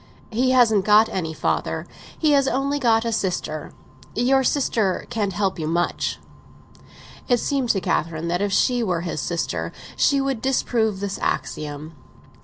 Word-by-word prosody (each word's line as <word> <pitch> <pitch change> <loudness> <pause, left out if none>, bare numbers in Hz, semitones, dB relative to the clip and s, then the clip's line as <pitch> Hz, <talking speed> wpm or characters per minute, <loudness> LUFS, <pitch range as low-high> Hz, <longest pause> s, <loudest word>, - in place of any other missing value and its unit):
"He 250 +4 +1
hasn't 230 -6 +4
got 215 +2 +5
any 165 -4 -3
father—he 300 - -2
has 275 -2 +4
only 275 +2 0
got 230 -3 +3
a 230 - 0
sister. 175 -7 -2 0.4
Your 265 +3 +3
sister 225 -8 +1
can't 205 -3 -1
help 195 -3 -1
you 155 - -2
much." 170 +2 -1 1.1
It 245 - +5
seemed 265 0 -1
to 195 - +2
Catherine 165 -2 -1
that 175 +2 0
if 205 0 0
she 245 +5 +2
were 180 -7 0
his 165 -3 -3
sister 170 -1 -2 0.2
she 280 - +3
would 270 -4 -1
disprove 225 -6 0
this 200 -1 -3
axiom. 150 +1 -3
215 Hz, 150 wpm, -23 LUFS, 175-250 Hz, 1.1 s, got